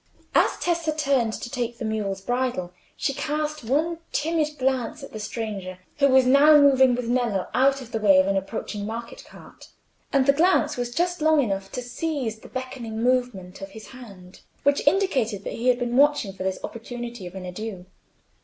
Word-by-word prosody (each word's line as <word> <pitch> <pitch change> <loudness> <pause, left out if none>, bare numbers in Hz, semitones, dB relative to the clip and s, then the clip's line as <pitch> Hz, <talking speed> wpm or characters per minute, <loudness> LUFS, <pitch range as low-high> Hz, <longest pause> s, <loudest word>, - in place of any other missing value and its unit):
As - - +3
Tessa 340 -2 0
turned 270 -7 +1
to - - -5
take 240 -3 -3
the 230 - -5
mule's 205 -3 -2
bridle, 245 -6 -2 0.2
she 275 - -1
cast 300 +1 -3
one 315 +8 0
timid 305 -1 -1
glance 255 -3 -1
at - - -10
the 215 - -6
stranger, 210 -4 -5 0.2
who 280 - +5
was 260 -1 +5
now 285 +4 +7
moving 265 -3 +5
with 245 -1 -4
Nello 235 -6 0
out 270 +1 +3
of 245 -2 -11
the 225 - -1
way 200 -3 +5
of 185 - +5
an 195 0 0
approaching 205 +1 -4
market 230 +1 -7
cart; - - -15 0.4
and 275 -4 +3
the 280 - +5
glance 310 -1 +3
was 245 -1 -3
just 350 +4 -1
long 315 0 +4
enough 195 -6 -1
to 250 - -4
seize 245 -3 -3
the - - -13
beckoning 245 -4 -5
movement 245 -8 -1
of 195 - -6
his 220 - -11
hand, 200 -8 -13 0.2
which 285 0 +2
indicated 270 - +1
that - - -5
he 240 - -3
had 250 -1 +4
been 245 -1 -2
watching 280 -7 +3
for 190 - -11
this 190 0 -1
opportunity 240 -3 -7
of 175 - -11
an 190 -1 -6
adieu. 185 0 -6
245 Hz, 190 wpm, -24 LUFS, 215-280 Hz, 0.4 s, now